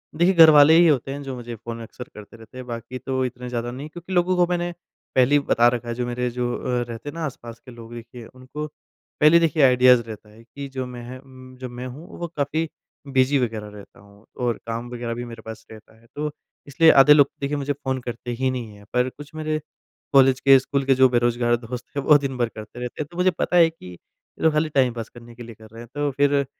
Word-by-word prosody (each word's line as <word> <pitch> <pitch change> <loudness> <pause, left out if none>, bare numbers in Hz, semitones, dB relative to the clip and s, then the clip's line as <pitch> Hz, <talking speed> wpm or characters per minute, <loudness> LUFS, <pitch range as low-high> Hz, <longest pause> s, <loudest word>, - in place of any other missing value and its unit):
देखिए 175 +4 +3
घर 165 -2 +9
वाले 150 +1 +7
ही 170 -1 +6
होते 135 -3 +1
हैं 140 +1 -6
जो 135 -1 -6
मुझे 120 -1 -7
फ़ोन 115 +1 -8
अक्सर 125 +2 -10
करते 105 +2 -13
रहते 115 +3 -15
हैं। 130 - -7
बाकी 120 +2 -6
तो 130 +1 -2
इतने 125 0 -6
ज़्यादा 120 0 -3
नहीं 140 +5 -8
क्योंकि 175 +3 -9
लोगों 180 +1 +2
को 175 -1 +4
मैंने 175 0 -1 0.4
पहले 130 +3 +4
ही - - +5
बता 120 +1 +5
रखा 120 -1 -1
है - - -2
जो 125 0 -2
मेरे 125 0 -2
जो 120 0 -2
अ, - - -6 0.2
रहते 115 +5 -7
हैं - - -9
ना 165 -1 -3
आसपास 120 -4 -8
के 125 - -11
लोग 115 0 -12
देखिए 120 0 -10
उनको 130 +5 -8
पहले 155 +2 +1
देखिए 160 -3 +2
आइडियाज़ 125 -1 +6
रहता 110 -1 -10
है 110 +2 -17
कि 140 +3 -9
जो 130 - -2
मैंह 125 +1 -9 0.4
जो 130 -1 -6
मैं 125 +1 -7
हूँ 150 +8 -10
वो 170 - -3
काफ़ी 155 +3 -1 0.4
बिज़ी 135 +1 +2
वग़ैरह 110 -4 -3
रहता 105 -1 -14
हूँ 100 +1 -20 0.2
और 120 - 0
काम 115 +1 -4
वग़ैरह 120 -1 -4
भी 120 +1 -5
मेरे 115 -1 -10
पास 110 0 -9
रहता 110 0 -15
है। 115 - -24
तो 150 0 -3 0.4
इसलिए 160 +4 +5
आधे 140 +2 +7
लोग 145 -2 +5
देखिए 145 +1 -1
मुझे 145 0 -2
फ़ोन 130 -2 -3
करते 120 0 -6
ही 130 0 +1
नहीं 115 -5 -6
हैं। 100 0 -16
पर 125 +1 +2
कुछ 145 +3 -13
मेरे 155 0 -2 0.5
कॉलेज 135 -1 +5
के, 135 0 +7
स्कूल 140 +1 -2
के 135 -1 +4
जो 130 0 +6
बेरोजगार 120 0 +1
दोस्त 120 +1 -7
हैं 140 - -1
वो 150 0 +6
दिन 135 -2 -4
भर 120 -2 0
करते 110 +3 -11
रहते 125 +4 -5
हैं। 145 - -4
तो 170 - -12
मुझे 185 +1 +3
पता 175 +1 -1
है 165 -1 +6
कि 165 - -17
ये 90 - -15
लोग 160 -1 +4
खाली 155 +1 +1
टाइम 130 -4 +2
पास 115 -2 -6
करने 120 -1 -14
के 120 - -10
लिए 115 -1 -11
कर 110 0 -15
रहे 115 +1 -11
हैं। 120 - -12
तो 145 0 0
फिर 140 +1 +2
130 Hz, 250 wpm, -23 LUFS, 120-145 Hz, 0.5 s, घर